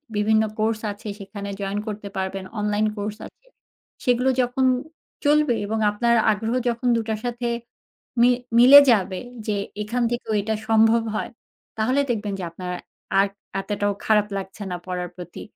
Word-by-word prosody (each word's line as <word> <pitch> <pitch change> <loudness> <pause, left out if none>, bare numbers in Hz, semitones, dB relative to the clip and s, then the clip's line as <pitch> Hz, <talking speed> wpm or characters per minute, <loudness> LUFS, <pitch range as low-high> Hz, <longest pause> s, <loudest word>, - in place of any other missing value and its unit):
বিভিন্ন 215 +1 +3 0.2
কোর্স 220 0 +1
আছে 205 +2 -10
সেখানে 200 0 -7
join 200 0 -2
করতে 205 -1 -5
পারবেন 190 0 -3 0.2
অনলাইন 210 0 +1
কোর্স 205 +1 -4
আছে। - - -24 0.6
সেগুলো 250 +1 +2
যখন 250 +2 +1 0.6
চলবে 295 -4 +4
এবং 220 +2 -2
আপনার 235 +3 +2 0.2
আগ্রহ 220 +3 -1
যখন 240 +1 -2
২ 230 - +1
টার 220 -1 -1
সাথে 240 0 -2 0.7
মি 245 - +7 0.3
মিলে 265 +4 +11
যাবে 190 -4 +1 0.3
যে 210 - +1 0.3
এখান 240 +4 -1
থেকেও 240 -2 -2
এটা 220 +2 -1
সম্ভব 225 +1 +4
হয়, - - -2 0.5
তাহলে 255 +6 +2
দেখবেন 210 -3 -1
যে - - -4
আপনার 180 +1 -6 0.5
আর 195 - +4 0.3
এতটাও 205 0 -1
খারাপ 210 -1 +3
লাগছে 195 +2 -7
না 180 - -2
পড়ার 180 -1 -3
প্রতি 180 -1 -9
215 Hz, 155 wpm, -23 LUFS, 200-235 Hz, 0.7 s, মিলে